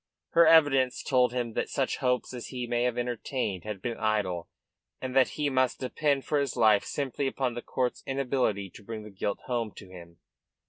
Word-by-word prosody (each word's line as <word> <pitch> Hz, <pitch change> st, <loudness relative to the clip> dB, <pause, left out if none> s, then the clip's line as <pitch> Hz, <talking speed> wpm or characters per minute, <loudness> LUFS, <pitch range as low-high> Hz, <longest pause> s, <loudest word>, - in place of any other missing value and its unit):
Her 170 Hz, -1 st, +6 dB
evidence 145 Hz, -6 st, +5 dB
told 125 Hz, -2 st, +3 dB
him 120 Hz, -2 st, -2 dB
that -, -, -2 dB
such -, -, -1 dB
hopes 125 Hz, 0 st, 0 dB
as 125 Hz, -2 st, -6 dB
he 125 Hz, -2 st, -4 dB
may 120 Hz, 0 st, 0 dB
have 125 Hz, -1 st, 0 dB
entertained 120 Hz, -5 st, -2 dB
had 105 Hz, -3 st, -6 dB
been 120 Hz, -2 st, -3 dB
idle, 105 Hz, -6 st, 0 dB, 0.5 s
and 130 Hz, 0 st, -5 dB
that 130 Hz, -2 st, +4 dB
he 150 Hz, -1 st, +1 dB
must 130 Hz, -2 st, +1 dB
depend 140 Hz, +1 st, 0 dB
for 150 Hz, -, +1 dB
his 140 Hz, -3 st, -1 dB
life 110 Hz, -3 st, +5 dB
simply 140 Hz, -1 st, -2 dB
upon 130 Hz, -2 st, -1 dB
the 120 Hz, -, -5 dB
court's 125 Hz, 0 st, -2 dB
inability 125 Hz, -8 st, 0 dB
to -, -, -14 dB
bring 110 Hz, 0 st, -6 dB
the 105 Hz, -, -10 dB
guilt 100 Hz, +1 st, -3 dB
home 120 Hz, -4 st, -1 dB
to 95 Hz, -3 st, -12 dB
him. 85 Hz, -2 st, -12 dB
125 Hz, 195 wpm, -28 LUFS, 110-130 Hz, 0.5 s, Her